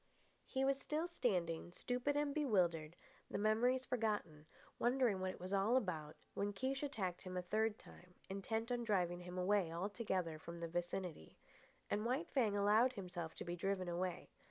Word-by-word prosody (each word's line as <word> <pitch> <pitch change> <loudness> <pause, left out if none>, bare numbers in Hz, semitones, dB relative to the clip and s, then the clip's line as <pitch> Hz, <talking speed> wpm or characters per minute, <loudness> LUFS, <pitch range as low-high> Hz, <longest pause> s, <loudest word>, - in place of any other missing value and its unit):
He 265 0 +1
was 275 0 +2
still 310 +3 -1
standing, 175 - 0
stupid 250 +8 0
and 290 -1 +1
bewildered, 175 - +2 0.3
the - - -2
memories 240 +5 +3
forgotten, 205 -11 -1 0.3
wondering 240 -5 +3
what 185 0 0
it - - -6
was 185 +2 -4
all 200 +6 +4
about, 160 -10 -2 0.2
when 205 0 -1
Kiche 265 +6 -1
attacked 205 -12 -2
him 185 -1 -5
a 180 - -1
third 215 +3 +1
time, 180 0 -15
intent 220 +4 -2
on 240 -1 0
driving 180 -5 +1
him 180 +1 -7
away 185 -2 +3
altogether 185 -3 -1
from 170 +2 -7
the 170 - -2
vicinity. 175 - -3 0.5
And 210 - 0
White 260 +9 0
Fang 220 -7 +3
allowed 215 +5 +5
himself 180 -6 -5
to - - -5
be 175 0 -2
driven 185 +1 -1
away. 175 0 -2
200 Hz, 170 wpm, -40 LUFS, 175-240 Hz, 0.5 s, allowed